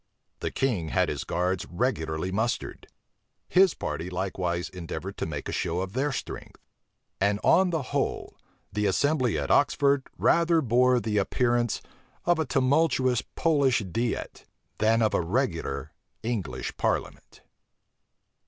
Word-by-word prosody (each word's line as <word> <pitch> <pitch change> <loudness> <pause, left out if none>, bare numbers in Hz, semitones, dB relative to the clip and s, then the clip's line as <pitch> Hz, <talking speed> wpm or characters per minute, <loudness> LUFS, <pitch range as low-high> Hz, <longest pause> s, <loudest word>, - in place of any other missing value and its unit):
The - - -2
king 110 -12 -1
had - - +2
his - - -3
guards 90 +2 -1
regularly 85 -5 -1
mustered: 110 +5 -2 0.6
his 185 -1 +4
party 80 +4 -4
likewise 90 -1 -2
endeavored 90 +2 -6
to - - -2
make 75 -3 -5
a - - -3
show 85 +1 -1
of 95 0 -5
their 140 +4 0
strength; 125 - -6 0.6
and 100 +1 +2
on 185 +2 +5
the 160 -4 -1
whole, - - -1 0.4
the 105 -1 +1
assembly 130 - +1
at 70 -2 -2
Oxford 140 -1 +3
rather 170 0 +4
bore 125 -1 +3
the 110 -3 0
appearance 120 +3 +1 0.4
of 175 -1 +3
a 160 - +1
tumultuous 130 -1 +2
Polish 140 -7 +3
diet, 115 +6 -3 0.3
than 110 +2 +3
of 110 - +2
a - - +2
regular 85 - -2 0.3
English 110 -5 -3
parliament. - - -2
115 Hz, 135 wpm, -27 LUFS, 90-135 Hz, 0.6 s, on